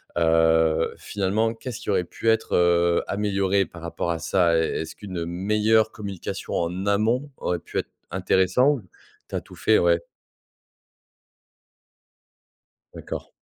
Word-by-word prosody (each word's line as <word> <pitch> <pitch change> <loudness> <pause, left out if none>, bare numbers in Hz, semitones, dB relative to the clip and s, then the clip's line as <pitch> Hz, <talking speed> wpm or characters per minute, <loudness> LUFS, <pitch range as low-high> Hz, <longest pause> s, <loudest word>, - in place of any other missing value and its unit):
Heu, 80 -1 +3
finalement, 105 +3 -1
qu'est-ce 120 +1 -7
qui - - -7
aurait 95 -3 +2
pu 115 - -2
être, 110 0 +1
heu, 85 -1 +3
amélioré 100 -1 +1
par 85 - -13
rapport 85 +1 -3
à 85 - -2
ça? 85 +1 +2
Est 80 - 0
est-ce 80 0 -7
qu'une, 95 -3 -7
heu, 85 - -2
meilleure 105 +5 +2
communication 100 -5 -6
en 90 +3 -1
amont 115 +8 +1
aurait 90 - -1
pu - - -7
être - - -5 0.2
intéressant, 95 +8 +3
ou 130 -7 -5 0.4
tu - - -18
as - - -1
tout - - -15
fait, - - +3
ouais. 85 0 +3 2.9
D'accord. - - -7
95 Hz, 145 wpm, -24 LUFS, 85-105 Hz, 2.9 s, Heu